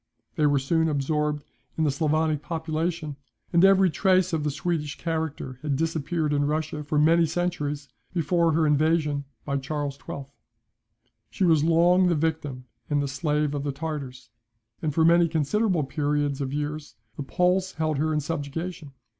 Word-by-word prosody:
They 150 - +3
were 145 -1 +3
soon 160 +4 +1
absorbed 150 +1 -1 0.3
in 160 - +1
the 150 - +3
Sclavonic 155 +1 +1
population, 160 -1 -3 0.4
and 170 +1 +5
every 195 -2 +6
trace 185 0 +2
of 155 -2 0
the 150 - 0
Swedish 150 0 -2
character 160 -6 -3
had 145 -2 -1
disappeared 160 0 -1
in 145 0 +2
Russia 150 0 -2
for 150 +1 -1
many 165 +2 +4
centuries 150 -4 -2 0.2
before 170 -1 +2
her 160 0 +3
invasion 150 -1 +2 0.2
by 140 -1 -1
Charles 140 0 -3
XII. 140 - -6 1.0
She - - -2
was 160 -4 +4
long 175 +3 +4
the 175 - +2
victim 150 -5 -2 0.2
and 145 -1 +2
the 140 - 0
slave 150 +1 0
of 145 - -2
the 145 - -1
Tartars; 140 -3 -6 0.5
and 155 - 0
for 160 +2 +3
many 170 +1 +5
considerable 170 +3 +1
periods 145 0 -1
of 135 -1 -2
years 150 +1 -4 0.2
the - - -6
Poles 180 +5 +1
held 155 -3 -1
her 155 +1 +1
in 150 -1 +1
subjugation. 150 +1 -5
155 Hz, 165 wpm, -26 LUFS, 145-165 Hz, 1.0 s, every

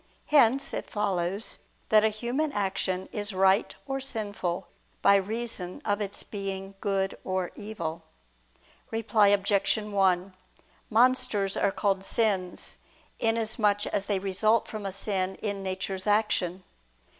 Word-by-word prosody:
Hence 275 -2 +4
it - - -4
follows 195 -1 -1 0.3
that 215 -1 +6
a 220 - +4
human 245 +8 -2
action 190 -2 -1
is 205 -2 -4
right 190 +2 +3
or 270 -1 -2
sinful 205 -8 -3 0.4
by 200 - +7
reason 200 -2 -2
of 205 0 0
its 200 -1 -3
being 195 -1 -5
good 195 -1 0
or 185 -1 -2
evil. 170 -7 -5 0.9
Reply 225 -2 +3
Obj. 200 0 +3
1: 195 -3 +1 0.6
Monsters 220 -4 +3
are 200 - +2
called 195 -1 0
sins, 195 -4 -1 0.4
inasmuch 220 -2 +1
as 200 - -1
they 200 -1 +1
result 200 +4 +2
from 215 -2 -5
a - - -3
sin 190 -1 -1
in 200 -2 -3
nature's 190 0 -3
action. 205 -4 +1
200 Hz, 125 wpm, -28 LUFS, 190-220 Hz, 0.9 s, by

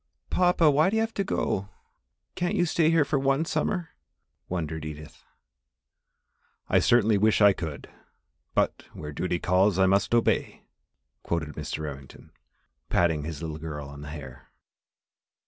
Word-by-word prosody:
"Papa, 175 -4 +4
why 155 +5 +4
do 210 - -2
you 220 - +2
have 225 0 -4
to 200 - -1
go 100 - -2 0.6
can't 175 +3 -1
you 175 -3 +2
stay 160 -1 +2
here 165 -3 +4
for 140 - 0
one 135 +3 +1
summer?" 175 0 -1 0.6
wondered 80 -3 -3
Edith. 75 0 -9 1.5
"I - - +4
certainly 110 -3 +3
wish 110 +1 +3
I 100 -2 +7
could, 80 -5 -6 0.7
but - - 0
'where 75 -1 -7
duty 90 +4 -1
calls 95 +2 +2
I 95 - +5
must 100 +4 +2
obey,'" 120 - +1 0.6
quoted 85 -3 -2
Mr. 75 +1 -5
Remington, 70 -3 -9 0.6
patting 80 -4 +1
his 80 -1 -6
little 80 -1 -5
girl 75 -3 -6
on 70 0 -10
the 75 - -8
hair. 70 -3 -10
95 Hz, 145 wpm, -27 LUFS, -, 1.5 s, I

